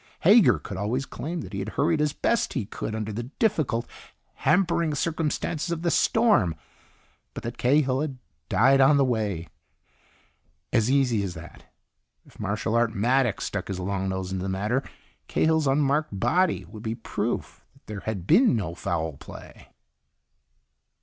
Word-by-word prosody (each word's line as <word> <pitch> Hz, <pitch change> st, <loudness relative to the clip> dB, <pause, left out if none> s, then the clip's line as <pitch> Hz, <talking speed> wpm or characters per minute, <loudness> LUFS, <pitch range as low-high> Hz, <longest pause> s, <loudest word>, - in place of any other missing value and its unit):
Hager 180 Hz, -, +6 dB
could 95 Hz, +5 st, -7 dB
always 115 Hz, +7 st, -1 dB
claim 165 Hz, +5 st, -5 dB
that 95 Hz, 0 st, -9 dB
he 100 Hz, -, -3 dB
had 100 Hz, +2 st, -3 dB
hurried 155 Hz, +1 st, +2 dB
as 150 Hz, -1 st, +2 dB
best 235 Hz, +9 st, 0 dB
he 125 Hz, -7 st, -2 dB
could 110 Hz, +1 st, -5 dB
under 110 Hz, -1 st, -4 dB
the 115 Hz, -, -3 dB, 0.2 s
difficult, 155 Hz, -, 0 dB, 0.5 s
hampering 170 Hz, -4 st, +1 dB
circumstances 160 Hz, +1 st, -2 dB
of 170 Hz, -1 st, -3 dB
the 170 Hz, -, +1 dB
storm, 210 Hz, -, +3 dB, 0.8 s
but -, -, -6 dB
that 120 Hz, +1 st, -6 dB
Cahill 135 Hz, 0 st, +2 dB
had 145 Hz, -4 st, -3 dB, 0.3 s
died 135 Hz, +4 st, +4 dB
on 140 Hz, +2 st, +6 dB
the 140 Hz, -, +4 dB
way. 105 Hz, -9 st, -1 dB, 1.3 s
As 115 Hz, -1 st, +3 dB
easy 130 Hz, -6 st, +2 dB
as 95 Hz, -3 st, -4 dB
that. 80 Hz, +1 st, -12 dB, 0.6 s
If -, -, -20 dB
Marshal 105 Hz, +2 st, -2 dB
Art 115 Hz, -1 st, +2 dB
Maddox 120 Hz, +2 st, +1 dB
stuck 100 Hz, -2 st, -4 dB
his 95 Hz, -2 st, -4 dB
long 95 Hz, +1 st, -2 dB
nose 95 Hz, 0 st, -3 dB
into 95 Hz, -1 st, -3 dB
the 95 Hz, -, -3 dB
matter, 105 Hz, +7 st, 0 dB, 0.5 s
Cahill's 160 Hz, -2 st, +2 dB
unmarked 140 Hz, -4 st, +1 dB
body 175 Hz, -, +1 dB
would 110 Hz, -, -11 dB
be 110 Hz, 0 st, -3 dB
proof 115 Hz, -, -4 dB
that -, -, -26 dB
there 105 Hz, -1 st, -6 dB
had 100 Hz, -3 st, -4 dB
been 240 Hz, -, +5 dB
no 90 Hz, -7 st, -2 dB
foul 80 Hz, -3 st, -3 dB
play. -, -, -12 dB
120 Hz, 160 wpm, -26 LUFS, 100-150 Hz, 1.3 s, Hager